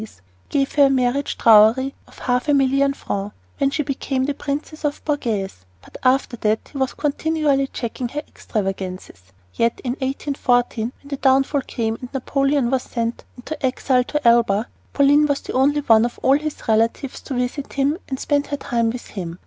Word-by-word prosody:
He 220 - -6 0.4
gave 275 -1 0
her 285 -1 +5
a - - +4
marriage 260 +1 0
dowry 225 +5 +5
of - - -18
half 250 +2 -1
a 290 - +4
million 275 +1 +2
francs 200 -4 -4 0.2
when 275 - +3
she 300 +2 -1
became 270 -1 -2
the 285 +2 0
Princess 290 +1 -4
Borghese, 215 - -2 0.2
but - - -18
after 255 -1 +2
that 215 0 -1
he 280 - -6
was 265 -1 -1
continually 295 -2 0
checking 245 0 -4
her 295 +5 -5
extravagances. 190 - -5 0.3
Yet 230 0 0
in 250 - -1
1814, 250 -3 -1
when - - -15
the 280 -1 -4
downfall 270 +1 +3
came 225 -2 -2
and 250 - -8
Napoleon 275 -1 +1
was 265 -1 +1
sent 235 -1 -4
into 295 +5 -7
exile 260 0 +1
at 285 +3 -2
Elba, 235 -2 +3 0.2
Pauline 290 +1 +4
was 285 -1 0
the - - -7
only 285 +3 +3
one 225 -5 +5
of 240 - -3
all 265 - +5
his 305 0 -6
relatives 230 +4 0
to 270 - -5
visit 250 +3 -3
him 285 +4 +1
and 265 -1 -3
spend 290 -1 0
her 285 - -3
time 235 -4 0
with 240 +1 -5
him. 175 -4 -6
265 Hz, 180 wpm, -21 LUFS, 235-280 Hz, 0.4 s, her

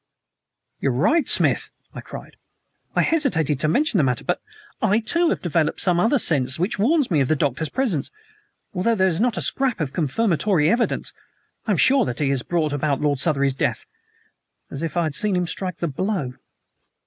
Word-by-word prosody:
"You 140 - 0
are - - 0
right, 295 - +2
Smith!" - - +2 0.2
I - - -7
cried. - - -10 0.6
"I - - +3
hesitated 160 - +1
to 155 - +1
mention 250 - +1
the - - +3
matter, 125 -3 0
but - - -2 0.4
I, 210 +3 +3
too, 335 +10 +1
have - - -2
developed 165 -3 0
some 175 -2 +2
other 230 +9 +3
sense 140 - +2
which 180 +5 -2
warns 280 - +2
me 155 - +3
of 135 - +1
the 155 - +2
Doctor's 140 +2 -1
presence. 230 - -1 0.6
Although 200 +5 +1
there 190 -2 +2
is 170 -2 0
not 235 0 +1
a - - -1
scrap 260 -6 0
of 145 -4 -3
confirmatory 170 - +1
evidence, 235 0 0 0.5
I - - +1
am - - +1
as - - +2
sure 270 -1 +4
that 120 - -4
he 140 -2 0
has 135 -2 0
brought 155 0 -1
about 145 -1 -1
Lord 145 -2 0
Southery's 140 -3 +1
death 130 - -2 0.9
as 140 - -5
if 165 +1 -4
I 170 - +2
had 155 -3 -2
seen 205 +6 +1
him 180 0 0
strike 185 +1 -4
the 170 - -2
blow." 165 -3 -2
170 Hz, 200 wpm, -22 LUFS, 145-220 Hz, 0.9 s, sure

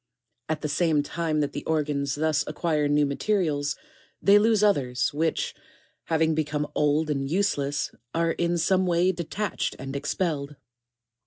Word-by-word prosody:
3. 155 - +1
At - - -21
the - - 0
same 155 -1 +2
time 155 0 -1
that 145 -1 -2
the 145 - -5
organs 145 -3 0
thus 155 0 +1
acquire 150 -1 0
new 145 0 +3
mate 140 +8 -5
rials, 150 -8 +1 0.4
they 200 +2 +6
lose 215 -1 +3
others, 130 -13 +1
which, 160 +2 -1 0.5
having 160 -1 +2
become 150 -1 -1
old 150 +1 +1
and 135 -1 -2
useless, 150 -5 0 0.2
are 165 0 +1
in 170 +1 0
some 185 +3 +2
way 175 +1 +3
detached 185 +3 -3
and 135 +1 -6
expelled. 150 -1 -2
155 Hz, 155 wpm, -26 LUFS, 145-170 Hz, 0.5 s, they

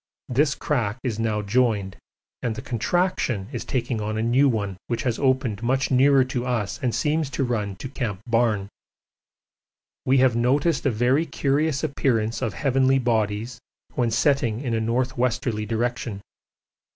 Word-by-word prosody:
This 140 +3 +2
crack 120 -7 -1
is 115 -4 -2
now 110 -2 0
joined, 105 -3 +1 0.5
and 115 -3 -2
the - - -6
contraction 120 - 0
is 120 - -4
taking 120 -3 -2
on 110 +1 -2
a 110 - 0
new 130 +4 +4
one 100 -5 -2
which 120 - -2
has 120 -3 -1
opened 130 -6 +1
much 130 +3 0
nearer 135 +1 +5
to 125 -1 -3
us 120 -5 -2
and 120 -4 0
seems 150 -1 0
to 140 - -1
run 105 -6 -2
to 110 - -7
C. 110 -7 -2
Barne. 115 -4 +1 1.4
We 135 +1 +3
have 130 -2 +4
noticed 140 +6 +2
a - - +4
very 125 +7 +2
curious 140 +1 0
appearance 120 -7 0
of 115 -5 -2
heavenly 135 -1 +2
bodies 110 -2 -1 0.3
when 120 -2 +1
setting 120 -2 +1
in 125 -5 -2
a 115 - 0
north 125 +3 -1
westerly 120 -3 0
direction. 115 -2 -2
120 Hz, 160 wpm, -24 LUFS, 110-135 Hz, 1.4 s, nearer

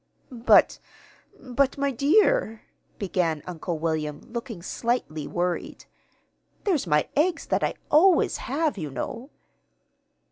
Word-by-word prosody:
"But 240 -1 +4 0.6
but, 265 +2 0
my 280 0 0
dear," 285 - +2 0.3
began 175 -6 -1
Uncle 175 -1 -4
William, 155 -2 -2
looking 230 -6 -7
slightly 190 - -2
worried, 175 0 -3 0.8
"there's 335 - 0
my 150 -2 +2
eggs 325 +3 +1
that - - 0
I - - 0 0.2
always 340 +3 +4
have, 290 -3 -2
you 155 -3 -4
know." 230 - -6
230 Hz, 110 wpm, -25 LUFS, -, 0.8 s, But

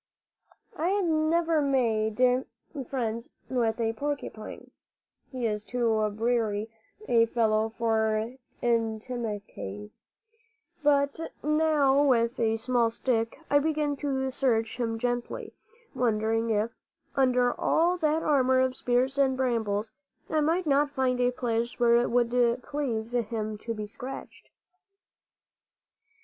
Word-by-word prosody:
I 325 - -1
had 395 -1 +1
never 320 0 +2
made 230 -6 +1 0.7
friends 230 -3 -3 0.2
with 235 -3 0
a 225 -1 0
porcupine, 280 -4 -5 0.6
he 255 -3 -3
is 210 -2 -1
too 240 0 0 0.2
briery 220 -1 -1 0.4
a 230 -1 +4
fellow 220 -1 +1
for 220 0 +1 0.3
intimacies, 220 - -3 0.8
but 285 0 +2 0.2
now 300 -3 +3
with 235 -4 +2
a 225 -1 +2
small 240 0 +1
stick 230 +2 -1
I 285 - +6
began 300 -1 0
to 265 -2 -1
search 235 -4 0
him 225 -2 -1
gently, 245 +1 -3 0.4
wondering 225 -1 +1
if, 220 +1 +1 0.4
under 250 -2 +3
all 345 +3 +3
that 315 -1 +1
armor 260 -3 +3
of 260 0 +1
spears 255 +3 0
and 265 -2 +3
brambles, 225 -4 -1 0.4
I 310 -1 +2
might 335 +4 +1
not 290 0 +3
find 260 -2 0
a 245 - +4
place 235 -1 -2
where 235 -1 +5
it 240 - +1
would 240 0 +2
please 245 -7 -3
him 220 -2 -2
to 230 +1 -4
be 210 -1 -4
scratched. 255 +5 -9
245 Hz, 120 wpm, -28 LUFS, 225-275 Hz, 0.8 s, I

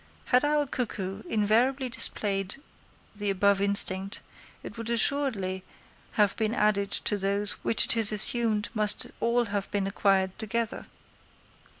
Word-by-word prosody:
Had 250 +1 +2
our 295 0 0
cuckoo 210 -7 -5
invariably 235 +6 0
displayed 200 -4 -2 0.6
the 205 0 -3
above 195 0 +1
instinct, 200 0 +4 0.4
it - - -10
would 230 0 -7
assuredly 225 -7 0 0.5
have 205 -2 +1
been 220 +1 -2
added 200 -2 0
to 205 0 -2
those 200 +1 -1
which 225 - +2
it - - +2
is 225 -2 +7
assumed 215 0 +2
must 210 -2 +3
all 235 +1 0
have 205 -2 -5
been 200 -2 -2
acquired 195 -1 -1
together. 230 0 -4
210 Hz, 130 wpm, -26 LUFS, 200-230 Hz, 0.6 s, is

